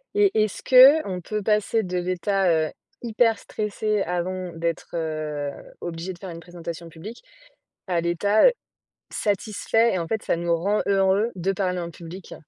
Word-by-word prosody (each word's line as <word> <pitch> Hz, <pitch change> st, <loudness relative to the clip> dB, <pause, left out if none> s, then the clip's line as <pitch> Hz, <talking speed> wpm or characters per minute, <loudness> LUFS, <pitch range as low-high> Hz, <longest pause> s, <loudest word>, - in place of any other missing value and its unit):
Et 410 Hz, -1 st, +4 dB
est-ce 215 Hz, -, -4 dB
qu'on 255 Hz, -, +6 dB
peut 210 Hz, +4 st, -3 dB
passer 215 Hz, +1 st, +1 dB
de 180 Hz, 0 st, -3 dB
l'état, 185 Hz, +1 st, 0 dB
heu, 160 Hz, -2 st, +2 dB, 0.3 s
hyper 230 Hz, -1 st, +2 dB
stressé 210 Hz, 0 st, -2 dB
avant 180 Hz, +1 st, -3 dB
d'être, 165 Hz, +1 st, -3 dB
heu, 155 Hz, -3 st, -3 dB, 0.3 s
obligé 170 Hz, +2 st, -5 dB
de 175 Hz, -, -16 dB
faire 190 Hz, -, -8 dB
une 165 Hz, -1 st, -8 dB
présentation 170 Hz, -1 st, -8 dB
publique, 190 Hz, -, -10 dB, 0.6 s
à 175 Hz, -2 st, 0 dB
l'état, 175 Hz, -, +3 dB
heu, -, -, +6 dB, 0.6 s
satisfait 215 Hz, +2 st, +1 dB
et, 185 Hz, -, 0 dB
en 165 Hz, -, -3 dB
fait, 220 Hz, -1 st, -2 dB
ça -, -, +1 dB
nous 170 Hz, 0 st, 0 dB
rend 200 Hz, +5 st, 0 dB
heureux 195 Hz, +3 st, +2 dB
de 185 Hz, +2 st, -1 dB
parler 185 Hz, -1 st, -1 dB
en 170 Hz, -1 st, -5 dB
public? 170 Hz, +2 st, -10 dB
185 Hz, 165 wpm, -24 LUFS, 170-210 Hz, 0.6 s, qu'on